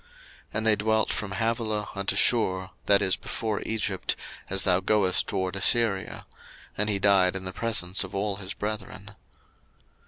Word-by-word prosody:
01:025:018 480 - -29 0.5
And 110 +1 -1
they 110 -1 +5
dwelt 110 +1 +1
from 105 -2 -4
Havilah 110 -2 -1
unto 100 -1 -2
Shur, 95 -6 +2 0.2
that 100 0 +5
is 95 -1 +2
before 110 -3 -4
Egypt, 105 -4 -1 0.3
as 95 0 +1
thou 90 -2 +3
goest 95 -1 +2
toward 95 -2 -2
Assyria: 100 -1 +2 0.5
and 105 +1 0
he 100 - +2
died 95 -2 +4
in 95 - -4
the 95 - -5
presence 105 -5 +1
of 95 0 -9
all 100 0 -1
his 100 +2 -6
brethren. 105 -1 -6
100 Hz, 160 wpm, -26 LUFS, 95-110 Hz, 0.5 s, they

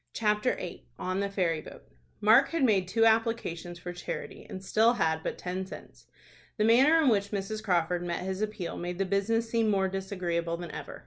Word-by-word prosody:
CHAPTER 210 +2 +1
VIII. 180 - -7
ON 185 +6 -2
THE 200 0 -1
FERRY 175 -5 0
BOAT. - - -12 0.4
Mark 220 +6 +6
had 330 -3 -1
made 200 -7 +3
two 225 +4 +3
applications 220 -7 0
for 175 +1 -7
charity, 175 - -6
and 190 0 -7
still 225 +4 +4
had 160 -8 0
but - - -4
ten 180 +1 -4
cents. 190 - -12 0.5
The 215 - +2
manner 265 +8 +6
in - - +3
which 200 -3 +1
Mrs. 210 +2 -4
Crawford 175 -3 +1
met 175 0 -3
his 190 +1 -3
appeal 210 -5 -3
made 175 0 -4
the 195 - 0
business 215 +4 0
seem 225 -1 +1
more 195 -2 +2
disagreeable 180 -3 -2
than 170 -2 -7
ever. - - -8
195 Hz, 195 wpm, -29 LUFS, 175-220 Hz, 0.5 s, Mark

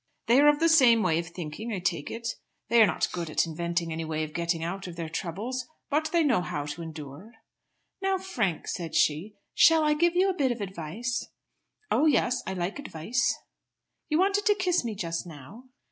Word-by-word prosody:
"They 240 +3 +5
are 290 - +6
of 295 0 +5
the 330 - +4
same 250 -9 +6
way 165 -3 +2
of 170 - -4
thinking, 170 +6 -6
I 205 - -2
take 175 -4 -2
it. 230 +1 -5 0.4
They 235 0 +6
are 215 - +7
not - - -1
good 170 -2 -4
at 155 - +2
inventing 170 +1 -2
any 165 +1 -3
way 155 0 -2
of 155 0 -6
getting 170 -1 -1
out 185 +3 -4
of 175 - -8
their 165 -2 -5
troubles; 210 +11 -4 0.2
but 310 +2 +1
they 340 -1 +3
know 245 -11 +3
how 145 -4 -4
to 150 +3 -6
endure." 160 - -9 0.7
"Now, 385 0 +1
Frank," 235 - -2
said 170 -3 -4
she, 165 +8 +1 0.2
"shall 325 -1 +6
I 300 0 +3
give 340 +3 +2
you 370 +2 +4
a 385 - +1
bit 275 -6 +1
of 240 - -4
advice?" 200 +6 -4 0.6
"Oh 315 - +4
yes! 250 -3 +2
I 190 - -2
like 185 +7 -3
advice." 235 - -1 0.7
"You 305 - +2
wanted 400 +3 +2
to 415 - +5
kiss 365 -6 +1
me 225 -3 -4
just 170 -1 -3
now." 165 - -12
200 Hz, 205 wpm, -27 LUFS, -, 0.7 s, are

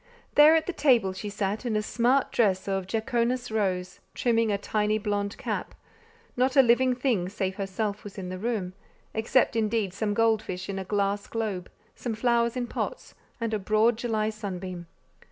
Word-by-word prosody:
There 300 +2 +8
at 320 - +2
the 365 - -3
table 235 - +3
she 205 +2 -5
sat 205 +2 -2
in 235 -3 -1
a 215 - +1
smart 245 +5 +2
dress 195 -5 +2
of 195 -1 -1
"jaconas 235 +3 -1
rose," 185 -4 -1 0.2
trimming 230 -2 +2
a 200 - +1
tiny 210 +1 0
blond 205 -1 -2
cap: - - -4 0.6
not 255 +1 +1
a 270 - +8
living 250 +1 +4
thing 240 -9 0
save 190 -1 -3
herself 200 +1 -3
was 205 -1 -10
in 185 -2 -5
the 185 0 -5
room, 205 -5 -2 0.4
except 230 +2 +2
indeed 215 -3 0
some 205 +1 -1
gold 225 -1 +3
fish 185 +1 -6
in 195 -1 -3
a - - -3
glass 200 +1 -1
globe, 210 -6 -3 0.2
some 235 -3 -4
flowers 235 +1 +1
in 245 - -1
pots, - - -5 0.3
and 230 -1 -2
a 215 - 0
broad 215 +4 +3
July 220 -2 -1
sunbeam. 185 -4 -6
215 Hz, 180 wpm, -27 LUFS, 195-235 Hz, 0.6 s, There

